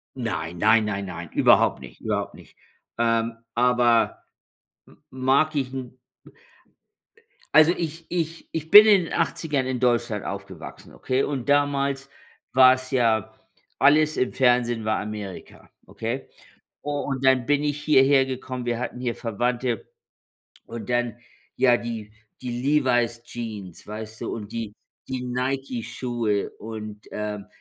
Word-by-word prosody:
Nein, 90 -9 -4
nein, 110 +4 +4
nein, 100 -1 -3
nein. 85 -3 -7
Überhaupt - - +4
nicht, 65 -2 -13
überhaupt - - -2
nicht. - - -17 0.4
Ähm, 115 0 +1 0.2
aber 120 -1 +3 0.6
m - - -20
mag 135 +4 +1
ich 135 -2 -1
'n 130 -1 -7 1.6
also, 155 +2 +8
ich 165 0 -4
ich 165 -1 -3
ich 160 0 -4
bin 210 +1 +11
in 205 -4 +5
den - - -7
80ern 160 -5 0
in 130 -1 -2
Deutschland 120 -4 +1
aufgewachsen, - - -8
okay? 130 - -1
Und 140 -3 -3
damals 140 -1 +1 0.4
war 130 0 +8
es 130 0 -5
ja 115 -5 +1 0.4
alles 155 +2 +4
im 125 - 0
Fernsehen 120 -3 +2
war 110 - +1
Amerika, 105 -3 -8 0.2
okay? 120 +4 -5 0.6
U 145 - -3
und 140 -2 -3
dann 130 -2 +4
bin 145 0 +2
ich 150 0 -1
hierhergekommen, 135 -3 +2
wir 120 0 -1
hatten 125 - -4
hier 120 -2 -2
Verwandte. 120 0 -2 0.8
Und 115 -2 -8
dann 120 -2 0 0.4
ja 125 -2 +5
die 115 -3 -6 0.3
die 125 -1 -4
„Levi's-Jeans“, 120 - -1
weißt 110 +1 -8
du - - -3
und 110 -1 -7
die 115 -3 -4 0.4
die 130 -1 -3
„Nike-Schuhe“ 125 -4 -2
und, 105 -1 -7
ähm, 105 -1 -5
125 Hz, 135 wpm, -24 LUFS, 115-135 Hz, 1.6 s, bin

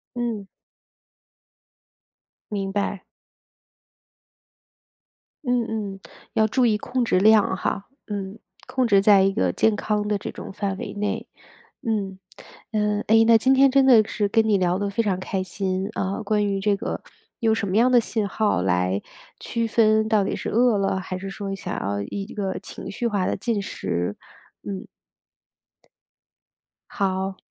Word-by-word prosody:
嗯。 230 -5 -3 2.0
明 195 -2 -2
白。 200 -1 -1 2.4
嗯 245 -2 +1
嗯， 205 -3 -4 0.3
要 220 0 +3
注 250 +3 +2
意 215 -2 +2
控 245 +3 -2
制 225 - +2
量 210 -1 +5
哈。 195 +2 -2 0.2
嗯， 200 0 -5 0.3
控 255 -1 0
制 200 -2 +5
在 200 -1 +6
一 195 - +3
个 90 - +1
健 220 - +2
康 210 0 -1
的 210 -1 +1
这 - - -6
种 - - -8
范 195 -1 -2
围 - - -6
内， 205 0 -3 0.6
嗯。 200 -4 -2 0.5
嗯， 210 -1 0
诶， 225 +1 +6
那 230 0 +7
今 260 +4 +3
天 270 +1 +6
真 270 0 +4
的 235 -5 +7
是 205 -2 0
跟 220 +1 +3
你 210 - +4
聊 180 -1 +1
得 205 0 -1
非 215 +4 0
常 195 -4 0
开 190 0 -2
心， 190 +1 -2
啊， 195 +3 -2
关 210 0 +1
于 195 -1 -1
这 205 +1 +2
个 200 - -4 0.4
用 225 -1 +3
什 220 -2 -1
么 185 - -2
样 240 +4 +4
的 245 - +7
信 220 -2 -1
号 205 - +1
来 90 +1 +1 0.4
区 230 0 -2
分 220 -1 +3
到 210 -3 +3
底 - - -2
是 - - -4
饿 235 -1 +3
了， 195 -1 0
还 185 0 -5
是 195 +1 -6
说 195 0 -5
想 195 - -5
要 100 +1 -2
一 200 -1 -4
个 195 -3 -2
情 - - -9
绪 240 - -4
化 200 -5 0
的 - - 0
进 215 0 -1
食， 90 - -3 0.5
嗯。 195 -2 -6 2.1
好， 190 -2 -1
205 Hz, 170 characters per minute, -24 LUFS, 195-220 Hz, 2.4 s, 那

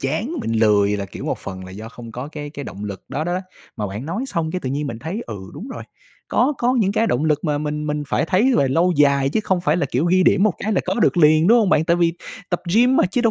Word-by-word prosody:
chán, 160 - -2
mình 115 - -3
lười 105 -2 +3
là, 100 - -3
kiểu, - - -9
một - - -2
phần 95 -1 -7
là 95 - -10
do 105 +4 -8
không 115 -1 -11
có 125 +5 -6
cái 145 -1 -6
cái 145 -2 -7
động 100 +2 -7
lực 100 -2 -7
đó 140 +4 -3
đó, 175 +2 -1 0.4
mà 105 - -2
bạn 105 +7 -6
nói 195 +11 -3
xong 165 -10 -2
cái 185 - -3
tự 130 - -4
nhiên 145 +2 -2
mình 115 -5 -5
thấy, 170 - -5
ừ, 110 - -6 0.2
đúng 235 - -8
rồi, 260 - -7 0.5
có 260 +5 +2
có 245 +1 +2
những 200 -3 +2
cái 225 +2 +1
động 150 - 0
lực 155 0 +1
mà 150 -2 0
mình 150 0 -3
mình 150 0 -2
phải 140 - 0
thấy 210 +10 +3
về 135 - +3
lâu 170 +7 +2
dài 140 -2 +3
chứ 185 - 0
không 190 -3 +1
phải 165 -2 +1
là, 175 - 0
kiểu, 130 +6 +1
ghi 185 +2 +4
điểm 190 - +4
một 215 -2 +4
cái 215 - -2
là 190 - +2
có 185 - -1
được 210 -3 +2
liền, 155 0 +5
đúng 235 +4 +6
hông 210 -5 +2
bạn? 155 - +3
Tại 170 +1 +2
vì 170 -1 +2 0.4
tập 175 - 0
gym 245 +4 +5
mà - - +4
chứ 200 +7 -1
đâu 230 -2 +3
155 Hz, 300 wpm, -21 LUFS, 130-190 Hz, 0.5 s, đúng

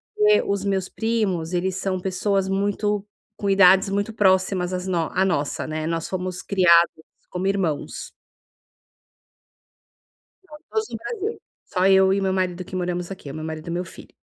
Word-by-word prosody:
porque 425 0 +4
os 200 0 -2
meus 190 -2 -1
primos, 200 -7 -1
eles 180 +1 0
são 190 -1 -2
pessoas 190 +1 0
muito 205 +1 0 0.3
com 200 - -3
idades 195 0 +6
muito 200 +2 -1
próximas 190 -3 +2
às 180 +1 -3
no 170 -3 0
à 190 - +2
nossa, 160 -7 -1
né. 155 0 -3
Nós 165 0 -2
fomos 185 -1 -3
criados 170 -4 +4 0.3
como 180 +1 -4
irmãos. 185 -7 -2 2.3
Todos 365 +7 -5
no - - -5
Brasil, 440 -1 -4 0.2
só 185 -1 +1
eu 190 0 +5
e 200 - +1
o 195 - -2
meu 190 - +1
marido 185 -1 -1
que - - -8
moramos 180 0 -2
aqui, 150 -7 -8
meu 155 - -6
marido 160 +1 -6
e - - -3
meu 175 +2 -2
filho. - - -13
190 Hz, 165 wpm, -23 LUFS, 180-200 Hz, 2.3 s, idades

